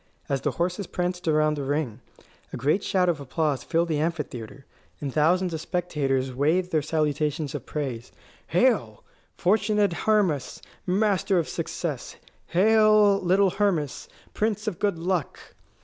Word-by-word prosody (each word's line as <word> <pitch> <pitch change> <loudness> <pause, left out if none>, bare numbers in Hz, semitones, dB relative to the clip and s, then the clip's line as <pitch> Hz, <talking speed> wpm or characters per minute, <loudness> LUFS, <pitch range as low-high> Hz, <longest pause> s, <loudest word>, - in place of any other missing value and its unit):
As 135 -2 -1
the 145 - 0
horses 180 +2 -1
pranced 180 -1 -3
around 155 -1 +2
the 145 - -3
ring, 135 -4 -2 0.5
a - - -5
great 150 - +1
shout 185 -2 +1
of 170 -4 +1
applause 145 0 -1
filled 170 +1 +1
the 155 -2 0
amphitheatre, 140 -6 -4 0.3
and 140 -3 -4
thousands 175 +4 +2
of 160 - -3
spectators 140 -8 -1
waved 165 +8 +1
their 155 - +2
salutations 150 -1 -1
of 145 -5 -6
praise: 130 -6 -4 0.4
"Hail, - - +1 0.3
fortunate 210 0 +2
Hermas, 185 -9 0 0.3
master 195 0 +2
of 165 - +1
success! - - -4 0.3
Hail, 215 +1 +5
little 190 +1 +3
Hermas, 175 -9 -1 0.2
prince 215 0 -1
of 210 -6 -3
good 200 -4 0
luck!" 175 -2 -2
165 Hz, 140 wpm, -25 LUFS, 145-190 Hz, 0.5 s, Hail